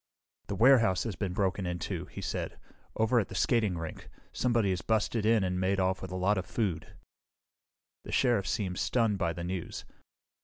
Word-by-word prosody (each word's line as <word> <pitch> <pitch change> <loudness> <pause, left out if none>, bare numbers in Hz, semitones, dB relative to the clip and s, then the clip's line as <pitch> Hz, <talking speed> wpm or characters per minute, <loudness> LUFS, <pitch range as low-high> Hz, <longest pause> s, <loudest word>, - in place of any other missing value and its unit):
"The 100 - -3
warehouse 115 -5 +5
has 115 -5 -4
been 100 -1 -2
broken 95 -1 0
into," 90 -2 -3
he - - -9
said. - - -4 0.4
"Over 110 +2 +3
at 105 - -1
the 95 - -9
skating 105 -4 +2
rink. 80 -1 -7 0.2
Somebody 115 -5 +1
has 90 - -1
busted 110 0 0
in 110 -3 +4
and 90 -1 -1
made 95 +1 +1
off 95 0 +1
with 95 - -6
a 90 - -5
lot 95 +2 +2
of 90 - -5
food." 95 -9 -2 1.1
The - - -7
Sheriff 120 -7 +2
seemed 95 -5 -2
stunned 115 -5 +1
by 85 -3 +1
the 85 0 -6
news. 90 -1 -5
95 Hz, 185 wpm, -30 LUFS, 90-110 Hz, 1.1 s, warehouse